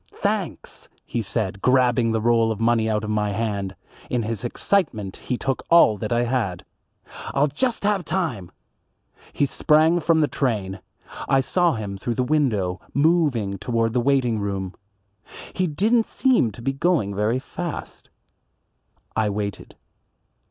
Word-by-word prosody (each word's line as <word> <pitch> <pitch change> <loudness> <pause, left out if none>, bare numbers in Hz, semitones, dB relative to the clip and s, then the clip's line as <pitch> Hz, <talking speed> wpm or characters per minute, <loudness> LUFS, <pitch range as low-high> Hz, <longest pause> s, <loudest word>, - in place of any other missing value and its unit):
"Thanks," - - -3 0.2
he 120 - -2
said 100 -2 -3
grabbing 125 -2 +3
the 110 - +1
roll 115 0 +3
of 110 - -4
money 115 -1 +2
out 105 0 0
of 110 - -3
my 105 -1 0
hand, 100 -3 -2 0.3
in 120 -2 0
his 110 0 -4
excitement 120 - -1
he 125 - -3
took 135 +1 -2
all 165 -10 +6
that 110 - -4
I 120 0 +2
had. 115 -8 -2 0.7
"I'll 140 +1 +4
just 230 - -1
have 200 -2 +1
time." 155 - -2 0.8
He 145 - +1
sprang 160 +4 +3
from 165 0 +2
the 150 - +3
train. 105 -10 -2 0.5
I 135 - +4
saw 175 +5 +2
him 100 -3 -5
through 120 +3 -2
the 125 - +1
window, 115 -11 0
moving 140 - +2
toward 115 -2 0
the 125 - +2
waiting 125 -4 +2
room. 95 -2 -3 0.8
He 185 -1 0
didn't 220 +9 +2
seem 255 - +2
going 135 - 0
very 105 +4 0
fast. 165 +5 -7 1.1
I 110 -1 +1
waited. 100 -1 -5
120 Hz, 145 wpm, -23 LUFS, 105-150 Hz, 1.1 s, all